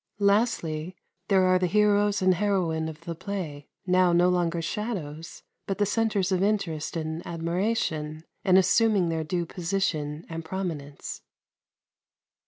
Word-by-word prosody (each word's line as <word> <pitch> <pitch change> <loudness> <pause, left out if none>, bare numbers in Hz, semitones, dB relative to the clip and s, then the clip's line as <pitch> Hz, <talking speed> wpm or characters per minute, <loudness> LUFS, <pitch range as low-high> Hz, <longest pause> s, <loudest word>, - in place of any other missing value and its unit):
Lastly, 195 -6 +1 0.3
there 195 -2 +4
are 185 0 +4
the 180 - +1
heroes 205 +1 +3
and 185 0 +5
heroine 175 -5 0
of 155 0 -10
the 170 0 -5
play, 165 -5 -5 0.2
now 180 -1 +4
no 175 +1 +4
longer 175 -2 +1
shadows, 165 -4 -5 0.2
but 195 - -2
the 205 - +2
centres 205 -2 +1
of 185 -1 +2
interest 180 -7 -1
and 160 +1 -3
admiration, 165 -3 -2 0.2
and 185 -2 +5
assuming 200 -1 +4
their 160 -1 -1
due 170 +2 -2
position 165 -4 -2
and 165 0 -5
prominence. 160 -6 -5
180 Hz, 135 wpm, -27 LUFS, 160-200 Hz, 0.3 s, and